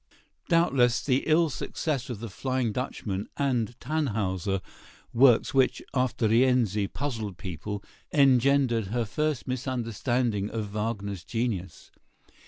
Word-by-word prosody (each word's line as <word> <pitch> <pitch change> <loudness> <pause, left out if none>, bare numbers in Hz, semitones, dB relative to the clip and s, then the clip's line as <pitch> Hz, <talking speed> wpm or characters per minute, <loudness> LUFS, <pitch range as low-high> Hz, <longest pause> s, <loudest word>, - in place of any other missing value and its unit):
] - - -48
Doubtless, 135 -8 +3
the 130 -1 +1
ill 160 0 +4
success 135 -2 -3
of 115 -4 -5
"The 115 - -5
Flying 130 +2 -1
Dutchman" 105 -5 -4
and 120 -5 0
"Tannhäuser," 105 - -1 0.5
works 125 +1 +5
which, 135 -1 +3
after 125 -3 +1
"Rienzi," 115 -3 +3
puzzled 110 -7 -4
people, 95 +2 -5 0.3
engendered 135 -4 +4
her 115 +3 -1
first 150 +4 -2
misunderstanding 120 -4 -1
of 105 -3 -4
Wagner's 100 -4 -3
genius. 115 -6 -3
120 Hz, 115 wpm, -27 LUFS, 105-130 Hz, 0.5 s, works